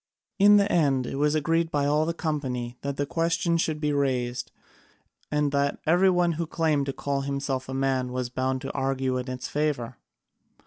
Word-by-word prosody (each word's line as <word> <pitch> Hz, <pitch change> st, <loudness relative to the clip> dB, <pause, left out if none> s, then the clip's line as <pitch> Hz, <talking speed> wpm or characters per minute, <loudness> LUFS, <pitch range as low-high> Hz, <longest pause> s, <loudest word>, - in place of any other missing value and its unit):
In 205 Hz, +1 st, +7 dB
the 200 Hz, 0 st, +2 dB
end 140 Hz, -6 st, +2 dB
it 135 Hz, -, -4 dB
was 150 Hz, +1 st, +2 dB
agreed 165 Hz, +2 st, +1 dB
by 145 Hz, -3 st, 0 dB
all 150 Hz, +2 st, +2 dB
the 170 Hz, -, 0 dB
company 130 Hz, -7 st, -3 dB
that 140 Hz, -1 st, -4 dB
the 145 Hz, -, 0 dB
question 165 Hz, +2 st, 0 dB
should 160 Hz, -2 st, 0 dB
be 150 Hz, -1 st, 0 dB
raised, 125 Hz, -3 st, -1 dB, 0.8 s
and 150 Hz, -1 st, +1 dB
that 140 Hz, 0 st, +1 dB
every 180 Hz, +4 st, +4 dB
one 175 Hz, -1 st, +2 dB
who 165 Hz, 0 st, -3 dB
claimed 155 Hz, -4 st, 0 dB
to -, -, 0 dB
call 140 Hz, 0 st, -2 dB
himself 135 Hz, -1 st, -3 dB
a -, -, -4 dB
man 135 Hz, -2 st, 0 dB
was 125 Hz, -1 st, -2 dB
bound 130 Hz, 0 st, -1 dB
to 135 Hz, -, -4 dB
argue 135 Hz, -1 st, -1 dB
in 125 Hz, +1 st, -5 dB
its 130 Hz, -1 st, -5 dB
favour. 140 Hz, -5 st, -2 dB
140 Hz, 190 wpm, -26 LUFS, 130-160 Hz, 0.8 s, In